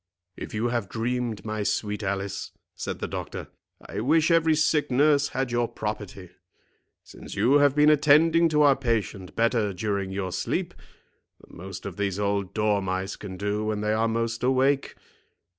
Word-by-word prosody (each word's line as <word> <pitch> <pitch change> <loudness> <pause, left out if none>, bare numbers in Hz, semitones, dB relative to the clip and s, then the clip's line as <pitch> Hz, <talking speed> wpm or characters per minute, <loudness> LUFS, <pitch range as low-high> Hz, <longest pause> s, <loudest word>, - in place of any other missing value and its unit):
"If - - -7
you 115 +3 0
have 115 -5 -2
dreamed, 120 -2 -2
my 110 0 -3
sweet 105 +1 -1
Alice," 100 0 -3 0.2
said - - -5
the - - -4
doctor, - - -6 0.4
"I - - -5
wish 155 +8 +3
every 160 -1 +4
sick 150 -1 +2
nurse 140 +2 +3
had 135 -3 -3
your 120 0 +1
property, 105 -4 -6 0.7
since - - -11
you 140 +5 +4
have 145 -1 +4
been 150 +1 +6
attending 160 +3 +5
to 150 -1 +3
our 140 -2 +6
patient 110 -7 -2
better 115 -3 +1
during 100 0 -2
your 95 -1 -3
sleep - - -2 0.7
than - - -17
most 95 +1 -8
of 100 -1 -6
these 100 -2 -1
old 100 -2 -1
dormice 100 -3 0
can 95 -3 -8
do 105 +2 -2
when 105 -1 -2
they 105 0 0
are 110 +1 +1
most 115 0 -2
awake. 135 +2 +1
110 Hz, 165 wpm, -26 LUFS, 100-135 Hz, 0.7 s, been